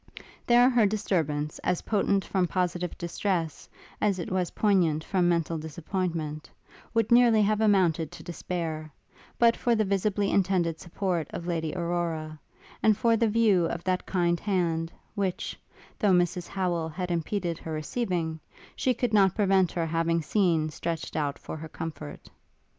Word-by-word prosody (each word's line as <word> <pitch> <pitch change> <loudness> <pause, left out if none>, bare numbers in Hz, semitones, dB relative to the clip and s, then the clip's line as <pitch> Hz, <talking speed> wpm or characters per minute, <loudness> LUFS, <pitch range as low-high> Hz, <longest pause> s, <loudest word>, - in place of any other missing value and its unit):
There 245 +1 +6
her 240 -5 +4
disturbance, 160 -8 -1
as 180 - -1
potent 200 -2 +1
from 185 -2 +1
positive 180 -1 -2
distress, 170 -2 -2 0.3
as 205 -3 +2
it 175 - -5
was 185 -2 0
poignant 175 -7 +2
from 180 -2 +1
mental 165 -1 0
disappointment, 160 -1 -4 0.5
would 225 -1 +2
nearly 235 -3 +6
have 215 +1 +1
amounted 180 -7 +3
to - - -10
despair, 165 -3 -4 0.5
but 235 -1 +5
for 240 -1 +1
the 215 -1 +1
visibly 200 +1 0
intended 175 -4 +1
support 175 -3 -2
of 170 - -6
Lady 165 -2 -2
Aurora; 170 -3 -2 0.4
and 215 -2 +4
for 230 0 +3
the 225 0 +2
view 210 -5 +3
of 170 +1 -4
that 185 0 -1
kind 175 -2 +1
hand, 170 -5 0 0.2
which, 195 -4 -2 0.4
though 205 -3 +3
Mrs 175 0 +1
Howel 175 -4 -1
had 180 +2 -4
impeded 170 0 -2
her 160 - -7
receiving, 160 0 -2 0.4
she 255 -1 +1
could 240 -1 -1
not 195 -3 +4
prevent 195 -4 +3
her 170 -2 -1
having 165 0 0
seen 165 -3 +1
stretched 165 +1 -4
out 145 -2 -1
for - - -7
her 160 +1 -8
comfort. 155 - -7
175 Hz, 155 wpm, -27 LUFS, 165-200 Hz, 0.5 s, There